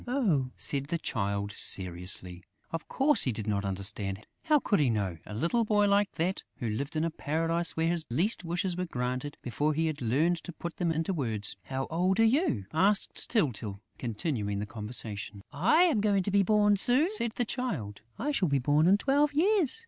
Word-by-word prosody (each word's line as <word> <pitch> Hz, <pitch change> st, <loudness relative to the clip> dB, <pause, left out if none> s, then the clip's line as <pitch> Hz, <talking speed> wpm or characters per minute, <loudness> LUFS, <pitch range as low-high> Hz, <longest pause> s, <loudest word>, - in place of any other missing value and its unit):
"Oh!" 195 Hz, -, +1 dB
said 140 Hz, -1 st, -1 dB
the 170 Hz, -, -1 dB
Child, 100 Hz, -8 st, -2 dB
seriously. 90 Hz, -2 st, 0 dB, 0.3 s
Of 165 Hz, -1 st, -5 dB
course, 290 Hz, +2 st, +4 dB
he 130 Hz, -, +4 dB
did 110 Hz, -2 st, -5 dB
not 100 Hz, -2 st, -1 dB
understand. 100 Hz, +1 st, -2 dB, 0.2 s
How 305 Hz, -2 st, +4 dB
could 205 Hz, -7 st, +1 dB
he 140 Hz, -4 st, +3 dB
know, 100 Hz, -7 st, -2 dB
a 105 Hz, -, -7 dB
little 170 Hz, -, +1 dB
boy 210 Hz, -1 st, +2 dB
like 200 Hz, 0 st, +2 dB
that, 180 Hz, +3 st, -1 dB, 0.2 s
who 120 Hz, -, -4 dB
lived 140 Hz, +8 st, -4 dB
in 155 Hz, -, 0 dB
a 165 Hz, -, -1 dB
paradise 165 Hz, +3 st, -1 dB
where 160 Hz, -, +1 dB
his 170 Hz, -1 st, 0 dB
least 180 Hz, -, +1 dB
wishes 175 Hz, +2 st, -2 dB
were 180 Hz, +1 st, -2 dB
granted 125 Hz, +1 st, -4 dB
before 145 Hz, +5 st, -1 dB
he 160 Hz, +2 st, +1 dB
had 155 Hz, -3 st, -3 dB
learned 150 Hz, +9 st, +1 dB
to 170 Hz, +2 st, -9 dB
put 170 Hz, +1 st, -7 dB
them 170 Hz, -2 st, 0 dB
into 165 Hz, +4 st, -1 dB
words? 110 Hz, -, -1 dB
"How 135 Hz, 0 st, -3 dB
old 185 Hz, +5 st, +1 dB
are -, -, +6 dB
you?" 225 Hz, -, +1 dB
asked 195 Hz, +6 st, +2 dB
Tyltyl, 115 Hz, -, 0 dB, 0.2 s
continuing 110 Hz, -3 st, -2 dB
the 105 Hz, -, -3 dB
conversation. 105 Hz, -2 st, -6 dB
"I 210 Hz, -, +4 dB
am 305 Hz, -, +2 dB
going 200 Hz, -2 st, +2 dB
to 200 Hz, -, -2 dB
be 200 Hz, +1 st, +4 dB
born 205 Hz, +1 st, +3 dB
soon," 250 Hz, -, +4 dB
said 365 Hz, -, +3 dB
the 245 Hz, -, 0 dB
Child. 165 Hz, -, -4 dB, 0.2 s
"I 295 Hz, -, -1 dB
shall 190 Hz, -, +1 dB
be 140 Hz, -, +2 dB
born 145 Hz, +5 st, +2 dB
in 195 Hz, +2 st, +5 dB
twelve 285 Hz, +5 st, +1 dB
years.... 370 Hz, -, +4 dB
160 Hz, 200 wpm, -29 LUFS, -, 0.3 s, are